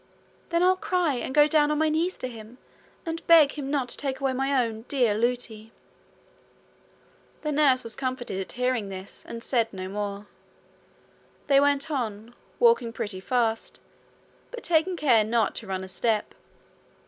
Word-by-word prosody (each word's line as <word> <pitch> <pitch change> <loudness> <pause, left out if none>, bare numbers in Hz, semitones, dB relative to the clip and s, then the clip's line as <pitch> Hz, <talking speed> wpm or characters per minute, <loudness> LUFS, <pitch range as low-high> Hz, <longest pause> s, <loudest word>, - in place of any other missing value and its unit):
'Then 340 +1 +2
I'll 370 +1 +4
cry, 360 -5 0
and 250 +1 -4
go 295 +2 +6
down 300 -1 +3
on 300 - 0
my 315 +1 +2
knees 325 +4 0
to 255 - -4
him, 230 0 -11 0.5
and 330 0 -5
beg 320 -4 +7
him 280 -2 -6
not 275 -3 0
to - - -4
take 270 -2 -3
away 270 -1 0
my 270 -1 +1
own 220 -1 -6
dear 245 -6 +2
Lootie.' 225 -1 -2 1.7
The 300 - -1
nurse 280 -3 +3
was 230 -2 -4
comforted 255 -7 -3
at 190 - -7
hearing 250 -4 -1
this, 190 0 -9
and 230 0 -7
said 230 -3 0
no 185 -1 -6
more. 200 +1 -4 1.2
They 275 -1 +5
went 285 +1 +1
on, 230 -4 -4 0.2
walking 465 - +4
pretty 205 -4 -5
fast, 225 +1 -1 0.7
but 485 -2 -8
taking 345 +2 +2
care 245 -8 +4
not 220 0 +1
to 220 - -6
run 190 -1 -3
a - - -7
step. 215 +2 -1
255 Hz, 165 wpm, -26 LUFS, 220-295 Hz, 1.7 s, beg